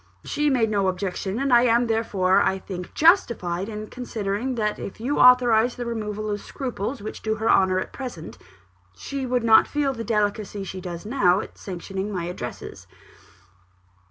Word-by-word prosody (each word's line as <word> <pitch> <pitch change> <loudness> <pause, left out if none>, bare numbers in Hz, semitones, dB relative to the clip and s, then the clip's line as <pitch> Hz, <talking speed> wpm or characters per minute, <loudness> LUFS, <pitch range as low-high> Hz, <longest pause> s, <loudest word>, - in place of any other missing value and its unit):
She 295 0 0
made 235 -5 +2
no 200 -2 +1
objection; 190 +2 -2
and 275 0 0
I 240 - +7
am, 240 0 +3
therefore, 210 -5 +2
I 190 - +1
think, 185 -2 -8
justified 225 - +2
in 215 -1 -6
considering 230 +1 -3
that 210 -2 -1
if 195 - -7
you 260 +6 -1
authorised 245 -2 +5
the 245 - -4
removal 215 -2 -3
of 205 -1 -3
scruples 250 -2 -5
which 215 - -7
do 220 0 -1
her 220 +1 -2
honour 190 -1 +3
at 185 - -4
present, 245 -12 -8 0.6
she 275 - -5
would 250 -1 0
not 220 -1 +6
feel 290 -2 0
the 230 -2 -5
delicacy 210 -2 -1
she 185 0 -7
does 175 0 -7
now 200 -6 +3
at - - -8
sanctioning 195 +2 -5
my 180 -4 -3
addresses." 170 -8 -7
215 Hz, 170 wpm, -24 LUFS, 190-245 Hz, 0.6 s, I